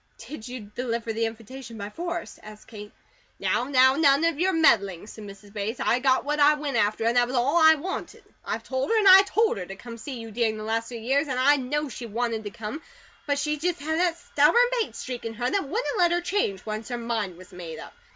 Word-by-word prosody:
"Did 230 0 -9
you 250 -1 -7
deliver 230 +2 -4
the 225 +1 0
invitation 230 +2 -9
by 205 0 -6
force?" 345 +4 -5
asked 215 0 -13
Kate. 210 -2 -10 0.5
"Now, 245 - 0
none 275 +3 +4
of 330 -3 0
your 375 +2 +2
meddling," 205 - +2
said 215 0 -10
Mrs. 200 0 -13
Bates. 215 +3 -4
"I 245 - +1
got 260 0 +2
what 295 +1 -1
I 295 +1 +6
went 295 -3 -4
after, 215 0 +1
and 230 +1 +2
that 245 0 +4
was 255 - -4
all 265 +7 +2
I 315 -1 +7
wanted. 360 +6 -6 0.2
I've - - -4
told 260 0 -2
her 455 - +3
an' 390 -2 +8
told 440 - +1
her 180 - -5
to 195 - -8
come 230 +3 -10
to - - -13
see 265 -4 -6
you 225 -1 -8
during 220 -1 0
the 215 - -6
last 225 +1 -2
three 235 -2 -7
years, 275 +6 +1
an' 260 -2 -2
I 285 +3 +4
know 295 +3 -2
she 245 -2 -7
WANTED 225 0 -2
to - - -3
come; 215 +9 -7 0.5
but 285 -1 +1
she 300 +1 -1
just 345 +2 -2
had 315 +3 -2
that 345 -2 +1
stubborn 335 +9 +3 0.2
Bates - - -5
streak 250 -2 -6
in 225 0 -5
her 245 +2 -2
that 385 -9 -1
wouldn't 460 - -2
let 350 -1 +4
her 350 0 +1
change, 345 - -1
once 215 +1 -5
her 245 - -3
mind 225 -6 -3
was 185 +1 -15
made 170 -3 -8
up. - - -10
250 Hz, 240 wpm, -25 LUFS, 220-300 Hz, 0.5 s, an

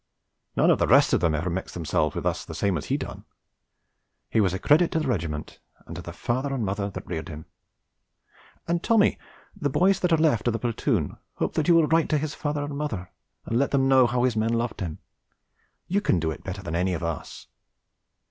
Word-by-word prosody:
None - - +4
of - - +2
the - - +2
rest - - +5
of - - +4
them 85 -3 +1
ever 85 +4 -2
mixed 95 +2 -4
themselves 80 -2 0
with - - -4
us - - 0
the - - -8
same 100 -2 +1
as 75 - -3
he - - +1
done; - - -7 1.1
he 110 - +3
was 95 -3 +2
a 95 - -2
credit 155 - +4
to 160 - +2
the 155 - -2
regiment 80 - -3 0.3
and - - -8
to - - -6
the - - -8
father 130 +4 -2
and 120 -5 -1
mother 100 +1 -2
that 95 - -8
reared 80 -3 -5
him; 75 0 -8 1.2
and 170 0 0
Tommy 220 -1 +3 0.4
the 155 -8 -1
boys 190 +7 +3
that 180 -2 0
are 165 - +5
left 145 -9 +2
of 120 - +2
the - - 0
platoon 115 - -1 0.2
hopes - - -2
that 155 - 0
you 170 - +6
will 165 -2 +5
write 165 +1 +2
to 155 - +2
his 150 0 -3
father 145 -1 -2
and 145 0 -5
mother 125 -12 -4 0.3
and 115 - 0
let 140 - +2
them 135 -1 +2
know 130 -2 +6
how 120 +1 0
his 125 -3 +2
men 110 +1 +1
loved 115 0 -1
him, 85 -4 -4 0.9
you 200 +3 +1
can 95 - +2
do 80 -1 -1
it - - -8
better 95 0 -6
than 85 -3 -5
any 90 +1 +1
of 85 - -5
us. 85 -2 -5
115 Hz, 230 wpm, -25 LUFS, 90-150 Hz, 1.2 s, you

